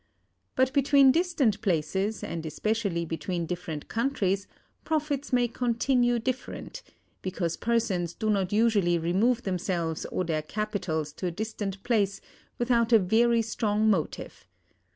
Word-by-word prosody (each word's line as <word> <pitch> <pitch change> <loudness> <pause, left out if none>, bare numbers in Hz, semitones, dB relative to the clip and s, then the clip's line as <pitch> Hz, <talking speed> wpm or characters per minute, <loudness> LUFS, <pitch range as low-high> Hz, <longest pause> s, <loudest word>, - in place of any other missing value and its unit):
But 260 0 +2
between 275 -1 +5
distant 315 - +1
places, 190 +3 -1
and 165 -1 -4
especially 195 +1 -1
between 165 +2 -3
different 165 -3 -5
countries, 205 -6 0 0.4
profits 295 -3 -1
may 245 -1 +3
continue 240 +1 +1
different; 255 - -4 0.4
because 175 -3 -2
persons 205 -7 0
do 215 -1 0
not 195 -3 0
usually 205 -5 +3
remove 200 +9 +1
themselves 175 -4 -2
or 185 - -2
their 160 -3 -1
capitals 175 -5 -3
to 180 - -4
a - - -1
distant 205 -3 -4
place 210 -5 +1 0.4
without 240 -1 +2
a 230 - +8
very 230 +4 +3
strong 215 -1 +1
motive. 165 -7 -3
210 Hz, 130 wpm, -27 LUFS, 180-240 Hz, 0.4 s, a